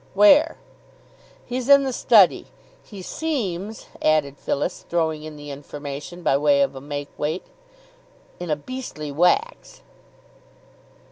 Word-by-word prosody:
"Where?" 285 +11 +6 0.9
"He's 250 +1 -4
in 280 0 +8
the 265 -1 -2
study. 215 -7 +4 0.3
He 200 -4 -11
seems 220 - -3
" - - -19
added 150 -3 +2
Phyllis, 160 +6 -2
throwing 160 -3 0
in 155 0 -9
the 145 -1 -9
information 145 +4 -8
by 135 - +3
way 140 -1 +4
of - - -1
a 135 - -8
make 145 0 -5
weight, 155 +5 -2 0.9
"in 175 -1 -6
a 150 - +2
beastly 155 - -7
wax." 420 - 0
170 Hz, 130 wpm, -23 LUFS, 145-240 Hz, 0.9 s, in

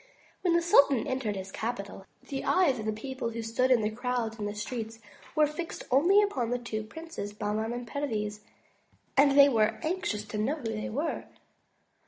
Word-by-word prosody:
When 350 -2 +2
the 340 - +3
sultan 280 -7 +5
entered 260 -6 -2
his 190 0 -6
capital, 200 -4 -5 0.2
the 270 -1 -4
eyes 335 -10 +3
of 215 - -4
the - - +2
people 235 +3 -4
who 230 0 -5
stood 230 +3 +1
in 220 -4 +3
crowds 240 -2 -2
in 205 - -2
the 205 - -5
streets, 225 +1 -4 0.4
were 305 - +5
fixed 310 +3 -5
only 355 +11 +6
upon 260 - -1
the 245 - 0
two 235 -3 -4
princes, 320 -3 -7
Bahman 210 +1 -2
and 240 0 -5
Perviz; 215 -6 -2 0.8
and 280 0 +5
they 280 0 +10
were 220 -4 +2
anxious 315 - -1
to 210 - -3
know 250 +8 +1
who 300 - -11
they 215 -1 -3
were. 295 +8 -2
240 Hz, 185 wpm, -29 LUFS, 215-280 Hz, 0.8 s, they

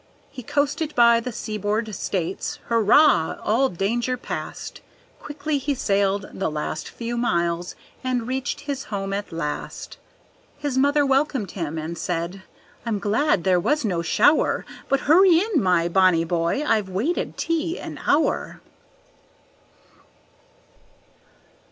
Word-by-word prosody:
He 255 - -8
coasted 295 +4 -1
by 235 -1 +6
the 250 +2 -5
seaboard 215 -1 -3
States. 185 -1 -3
Hurrah! 230 - +4
all 255 +5 +2
danger 235 +7 -1
past, - - -6 0.4
Quickly 290 0 -3
he 285 +1 -1
sailed 200 -4 0
the 190 - -2
last 155 +1 -4
few 235 0 -5
miles 175 -6 0 0.3
and 250 -2 -1
reached 260 +1 -3
his 280 -1 -4
home 195 -2 -4
at 205 +1 -4
last; 155 -3 -5 0.6
His 290 -2 -3
mother 285 +2 +3
welcomed 270 -7 +1
him, 165 -4 -4
and 160 +2 -5
said, 175 +2 -3 0.4
"I'm 225 -2 -1
glad 205 - +1
there 185 -2 +3
was 255 - 0
no 180 -5 0
shower; 230 - +3 0.2
But 275 0 +2
hurry 345 +3 +6
in, 390 - +1
my 180 -3 +2
bonny 180 -2 +4
boy, 170 - 0
I've 215 -7 +1
waited 225 - -2
tea 330 +1 -1
an - - -7
hour." 300 +2 +1
225 Hz, 125 wpm, -23 LUFS, 185-280 Hz, 0.6 s, by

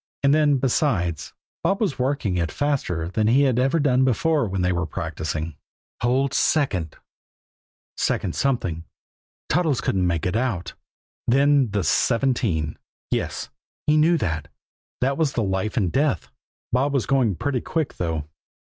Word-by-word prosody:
And 140 0 +5
then, 150 -2 +4
besides, 115 - 0 0.3
Bob 195 - +1
was 195 -12 -1
working 125 -7 0
it 85 -3 -1
faster 130 - -1
than 110 +3 0
he 130 +5 +4
had 130 -3 +2
ever 135 +6 +2
done 130 -3 +3
before 140 +2 +2
when 95 -1 -2
they 90 - +2
were 85 -2 -1
practicing. 80 0 -4 0.4
"Hold 130 +3 +1
second" 95 - +1 1.0
second - - -1
something 95 -12 -1 0.6
Toddles 155 -4 +1
couldn't 95 -2 0
make 85 -3 -1
it 90 - 0
out. 110 -8 -1 0.5
Then 140 0 +4
the 100 -1 -1
"seventeen" 115 - +1 0.3
yes, - - -2 0.4
he 150 - +3
knew 160 +3 +4
that 80 - -2 0.5
that 135 +3 +1
was 155 -4 +1
the 115 - 0
life 95 +4 -2
and 95 -7 +1
death. 135 - 0 0.4
Bob 140 +3 +2
was 130 - +1
going 130 -8 +2
pretty 135 +4 -1
quick, 160 -3 -2
though. 80 -4 -2
125 Hz, 145 wpm, -23 LUFS, 90-140 Hz, 1.0 s, And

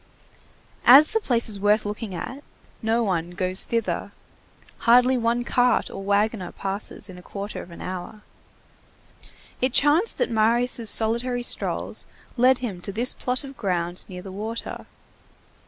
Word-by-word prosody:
As 275 +5 +9
the 445 - +1
place 245 - +2
is 205 -3 +1
worth 210 +2 +2
looking 210 -1 -5
at, 260 +10 -6 0.4
no 225 +1 +1
one 175 -5 -1
goes 185 +1 0
thither. 230 -2 -2 0.7
Hardly 250 +2 +5
one 240 0 0
cart 245 0 +1
or - - -7
wagoner 200 -1 0
passes 195 0 -5
in 180 -2 -11
a - - -12
quarter 200 +3 -6
of - - -12
an 170 - -10
hour. 185 +3 -7 1.4
It 255 0 +1
chanced 310 +10 +3
that - - 0
Marius' 230 +1 +2
solitary 235 +3 +1
strolls - - -1 0.3
led 255 +1 +4
him 190 -6 -6
to 200 - -4
this 235 +5 +2
plot 250 +2 -1
of 275 0 -10
ground, 175 -4 -3
near 180 -1 -8
the 195 - -8
water. 220 +4 -6
225 Hz, 150 wpm, -24 LUFS, 195-245 Hz, 1.4 s, As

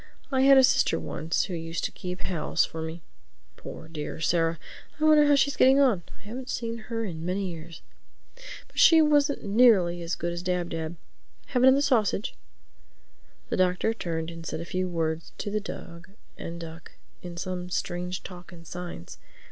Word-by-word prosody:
I 260 -1 +2
had 275 0 +7
a 265 - +7
sister 250 -10 +3
once 160 +2 -1
who 190 - -5
used 165 0 -4
to - - -1
keep 180 +1 -6
house 165 -5 0
for 160 - -7
me 160 +1 -6 0.5
(poor, 160 - -9
dear 155 -2 -6
Sarah! 165 0 +1 0.4
I - - -2
wonder 305 -1 +6
how 290 - +6
she's 280 +1 +2
getting 265 +2 +6
on—I 235 -11 +1
haven't 250 +5 -7
seen 230 -1 -3
her 225 -1 -2
in 165 -5 -6
many 185 +1 -2
years). 165 0 -10 0.8
But - - -7
she 325 - +8
wasn't 295 -2 +3
nearly 200 -5 +4
as 170 +1 -2
good 170 0 -3
as 170 - -4
Dab 180 -1 -1
Dab. 160 0 -4 0.5
Have 250 - +1
another 265 +2 +6
sausage?" 220 -7 +1 1.1
The - - -1
Doctor 185 +4 +2
turned 165 -6 -3
and 165 0 -9
said 160 - -4
a 170 - -5
few 185 +1 -2
words 165 -1 -2
to 205 - -4
the 215 +1 -1
dog 170 -3 -9 0.3
and 170 0 -7
duck 165 0 -10 0.3
in 175 -1 -8
some 180 0 -4
strange 180 +1 -3
talk 180 -1 -10
and 170 -2 -13
signs. 175 - -8
180 Hz, 180 wpm, -27 LUFS, 165-230 Hz, 1.1 s, she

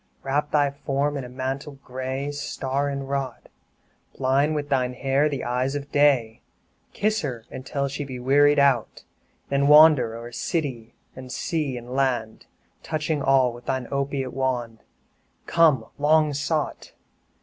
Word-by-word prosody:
2 135 - -7
Wrap 145 +2 0
thy 145 -2 +3
form 140 +1 -1
in 140 - -3
a 125 - -8
mantle 135 +3 -5
gray, 130 +2 -4
Star 140 -1 -2
inwrought! 140 -2 -4 0.7
Blind 140 +4 +2
with 145 -1 -2
thine 125 -2 0
hair 135 +3 +1
the 140 -3 -4
eyes 125 +3 -1
of 145 0 -5
Day; 135 -6 +2 0.5
Kiss 215 +1 0
her 120 -6 -5
until 140 +2 -3
she 145 +2 -4
be 130 -3 -7
wearied 145 +4 +4
out, 140 -5 +2 0.5
Then 140 0 +2
wander 150 -6 +7
o'er 120 +1 -8
city, 120 -5 -3 0.2
and 130 -1 -9
sea, 150 -6 -2
and 120 +1 -9
land, 125 -5 -1 0.3
Touching 155 -1 -2
all 130 -3 +3
with 120 +1 -13
thy 130 -2 -1
opiate 140 -2 -2
wand 125 -4 -2 0.7
Come, 155 -9 +3
long 155 0 +3
sought! 150 +1 -2
135 Hz, 145 wpm, -24 LUFS, 130-145 Hz, 0.7 s, wander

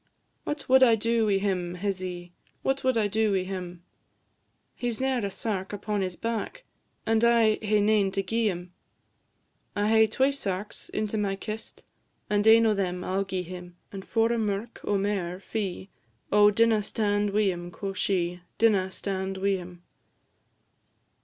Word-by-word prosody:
"What 295 -1 -4
wad 265 +1 +6
I 235 -3 +7
do 225 0 +1
wi' 200 -2 +3
him, 185 -3 -1
hizzy? 180 -2 -4 0.3
What 270 0 0
wad 260 -2 +2
I 215 -2 +2
do 215 +1 +1
wi' 190 -1 +1
him? 180 -2 -6 0.9
He 245 - -3
's 230 - -3
ne'er 260 -3 0
a 200 - -1
sark 195 -1 -3
upon 205 0 -2
his 185 -2 -2
back, 230 - -4 0.4
And 225 0 +2
I 230 -2 +4
hae 210 -1 +2
nane 205 -1 +3
to 195 0 0
gi'e 225 +3 0
him." 180 -2 -4 1.0
"I 205 +1 +1
hae 220 0 +5
twa 265 +6 +1
sarks 200 -6 -5
into 215 0 -2
my 200 -2 0
kist, 215 +3 -7 0.5
And 205 +1 +2
ane 225 +1 +7
o' 220 - +4
them 180 -3 -2
I 185 - -3
'll 195 0 +1
gi'e 190 -2 -3
him; 180 0 -9
And 195 -1 -7
for 225 +2 +1
a 235 - 0
merk 210 +2 -3
o' 205 - +1
mair 195 -3 -2
fee, 195 -2 -4 0.4
Oh, 210 0 +7
dinna 225 +1 +3
stand 205 -1 0
wi' 205 -1 +2
him," 175 0 -6
quo' 195 +2 -5
she; 180 -2 -1 0.2
"Dinna 200 -5 +3
stand 190 0 -3
wi' 195 0 +1
him. 175 -1 -11
205 Hz, 170 wpm, -27 LUFS, 190-220 Hz, 1.0 s, I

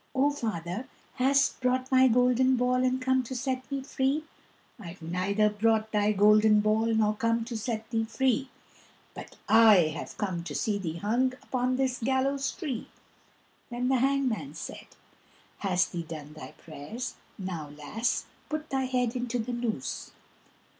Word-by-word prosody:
O 280 +2 +3
father, 215 - -4 0.3
hast 275 +1 +2
brought 255 +1 0
my 260 0 +6
golden 250 +2 +3
ball 250 +1 +1
And 255 0 +1
come 260 0 +2
to 255 +1 -7
set 260 +1 -3
me 275 -1 -2
free?" 270 +3 0 0.6
"I've 180 -3 -9
neither 185 +5 +1
brought 220 +1 +1
thy 210 0 +2
golden 210 +1 +5
ball 215 +2 +2
Nor 220 -2 +2
come 230 +1 0
to 235 0 -6
set 220 0 -3
thee 225 -1 0
free, 265 +3 0 0.6
But - - -10
I 205 -9 +6
have - - -7
come 185 -5 -2
to - - -5
see 210 -2 0
thee 165 -4 -4
hung 240 +7 +1
Upon 255 0 0
this 260 -1 0
gallows 270 +3 0
tree." 270 - -5 0.8
Then 245 +1 -2
the 265 - +3
hangman 275 0 0
said, - - -8 0.7
"Hast 185 -3 +1
thee 170 - -3
done 155 -2 -8
thy 155 - -10
prayers? 165 - -7 0.2
Now, 175 -7 -5
lass, 150 +11 -2 0.2
put 310 0 -4
thy 265 -1 0
head 250 -2 0
into 245 -1 -2
the 240 +1 -3
noose." 225 - -3
230 Hz, 155 wpm, -28 LUFS, 210-260 Hz, 0.8 s, my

